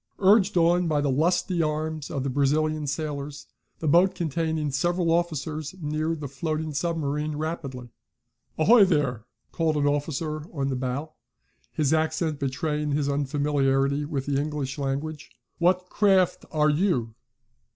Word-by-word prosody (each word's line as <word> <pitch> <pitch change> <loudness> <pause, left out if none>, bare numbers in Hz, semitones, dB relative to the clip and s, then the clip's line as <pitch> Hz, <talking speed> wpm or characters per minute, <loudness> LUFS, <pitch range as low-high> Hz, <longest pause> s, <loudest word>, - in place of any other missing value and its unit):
Urged 200 0 +4
on 175 +1 +3
by 150 -2 +1
the 145 -1 +1
lusty 170 +4 +1
arms 155 -1 -2
of 135 - -3
the 140 - -1
Brazilian 150 +2 +1
sailors, 145 0 -4 0.3
the 160 - -4
boat, 175 +5 +4
containing 160 -2 -1
several 175 +4 +1
officers, 155 -2 -1
neared 155 0 -2
the 145 - -4
floating 155 +2 -3
submarine 150 -1 -1
rapidly. 145 -6 -5 0.7
"Ahoy 215 +7 +6
there!" 140 - +1 0.3
called 160 -2 0
an 145 - +1
officer 150 +2 -1 0.2
in 135 0 0
the 135 - -1
bow, 130 +5 -3 0.6
his 150 -1 +1
accent 160 -1 0
betraying 150 +2 -1
his 145 -1 0
unfamiliarity 140 0 +1
with 145 -3 -3
the 140 -1 0
English 145 -2 -4
language. 145 +3 -3 0.3
"What 180 +1 +2
craft 195 -3 +2
are 150 -1 +3
you?" 145 - 0
150 Hz, 140 wpm, -26 LUFS, 140-165 Hz, 0.7 s, Ahoy